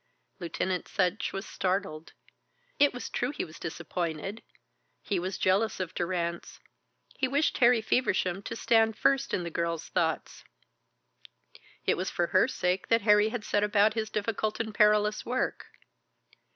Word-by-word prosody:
Lieutenant 180 +1 -2
Sutch 185 +1 0
was 195 +2 -5
startled. 185 -4 -3 0.7
It 290 0 +6
was 245 - -6
true - - -2
he 290 - -3
was 155 - -13
disappointed; 170 +4 -4 0.6
he 195 - -1
was 185 +2 -3
jealous 195 +4 +1
of 185 -1 -4
Durrance, 170 -1 -3 0.6
he 265 - +2
wished 285 +4 +1
Harry 245 -2 +5
Feversham 195 -5 0
to - - -4
stand 225 -1 +2
first 275 0 +2
in 180 - -1
the 170 - -5
girl's 170 -1 -2
thoughts. 165 -3 -1 1.4
It - - +2
was 185 +1 -2
for 175 - 0
her - - +5
sake 180 -6 -1
that 230 -2 +3
Harry 210 0 +5
had 225 -1 -4
set 205 - +1
about 210 +1 +3
his 220 -1 -2
difficult 215 0 -2
and 220 -2 -3
perilous 210 0 +3
work. 250 +2 -2
200 Hz, 150 wpm, -29 LUFS, 180-225 Hz, 1.4 s, It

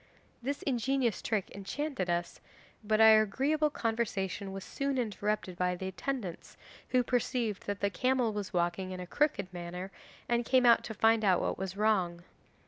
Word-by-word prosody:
This 275 +4 -3
ingenious 255 -2 0
trick 215 -4 -1
enchanted 220 - -3
us, 170 0 -2 0.4
but 215 +1 +1
our 220 -1 +8
agreeable 290 +8 +1
conversation 210 -6 -2
was 195 0 -6
soon 275 +3 -2
interrupted 210 -5 -2
by 180 0 +1
the 190 +1 -4
attendants, 195 -2 -5 0.3
who 255 -1 +3
perceived 240 -3 -1
that 205 0 -3
the 200 0 +1
camel 250 +1 +1
was 205 -1 -4
walking 175 +1 -1
in 185 -1 -6
a 180 - -5
crooked 200 - 0
manner 180 +2 -6 0.4
and 240 0 +1
came 255 +1 +3
to 235 -1 +4
find 225 +1 +4
out 185 -3 +4
what - - -2
was 190 0 -4
wrong. 185 -5 +1
215 Hz, 160 wpm, -31 LUFS, 190-245 Hz, 0.4 s, our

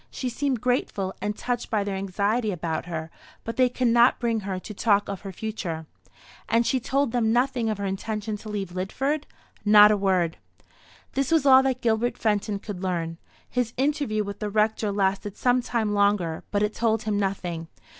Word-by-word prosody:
She 255 - -4
seemed 260 -1 -1
grateful, 210 -6 0
and 210 0 -2
touched 245 -1 -3
by 215 -3 +1
their 200 -1 -3
anxiety 200 +4 0
about 165 -2 -3
her, 160 -1 -5 0.3
but 230 - -5
they 255 0 +4
could 245 0 0
not 235 +2 +5
bring 230 -3 0
her 195 -2 -4
to 210 +4 -8
talk 205 -1 +2
of 200 -2 -5
her 195 - -6
future." 180 -6 -4 0.6
"And 230 +1 +3
she 260 - +2
told 275 +1 0
them 230 -2 +1
nothing 245 -1 +1
of 215 - -1
her 200 - -3
intention 210 +2 -3
to 215 - -10
leave 200 -4 -3
Lidford?" 270 +12 -2 0.4
"Not 210 0 +8
a - - +4
word." 185 -4 +1 0.8
This 275 +1 0
was 320 -3 +3
all 265 -1 +8
that 260 -1 -1
Gilbert 230 +1 +1
Fenton 210 -1 0
could 200 -2 -7
learn. 170 -3 -2 0.3
His 245 -2 -1
interview 270 -6 0
with 200 0 -7
the 210 - -2
Rector 215 0 +1
lasted 195 0 -1
some 250 0 +3
time 225 -3 -1
longer; 200 -5 +1
but 205 0 +1
it 210 +1 0
told 225 -1 +1
him 210 -1 0
nothing. 180 -4 -2
210 Hz, 190 wpm, -25 LUFS, 195-240 Hz, 0.8 s, Not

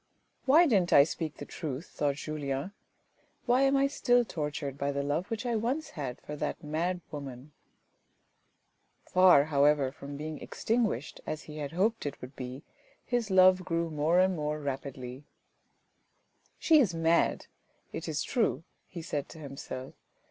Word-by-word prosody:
" - - -42
Why 315 +6 +7
didn't 195 - +2
I 140 - +9
speak 155 0 -4
the - - -7
truth? 155 -1 -5
" - - -25
thought 145 -2 +1
Julien. 145 +2 -4 0.4
" - - -40
Why 250 +1 +3
am 275 0 +4
I 275 - +4
still 245 -3 +2
tortured 150 -6 -4
by 140 0 -1
the 140 0 -2
love 150 +6 -1
which 225 +2 -3
I 240 -1 0
once 250 +8 -1
had 135 -6 -5
for 150 - -7
that 145 - -3
mad 170 +4 -1
woman? 140 -1 -8 0.8
" - - -45
Far, 180 -6 +7
however, 145 -2 +3
from 140 +1 -8
being 155 +1 -6
extinguished 220 - -1
as 155 - -4
he 150 0 -10
had 145 +1 -5
hoped 210 +1 +1
it 145 - -6
would 125 +2 -10
be, 130 +2 -7 0.4
his 240 -3 -1
love 185 -1 +6
grew 170 -2 -1
more 155 +4 +2
and 185 0 +3
more 150 -1 -2
rapidly. 135 -2 -5 0.7
" - - -45 0.5
She 315 -2 +5
is 200 -11 +2
mad, 165 +1 +2 0.5
it 165 - -5
is 150 -2 -1
true," 215 - 0 0.2
he 170 -3 -8
said 145 -4 -3
to - - -11
himself. 135 -3 -7
155 Hz, 170 wpm, -30 LUFS, 140-185 Hz, 0.8 s, I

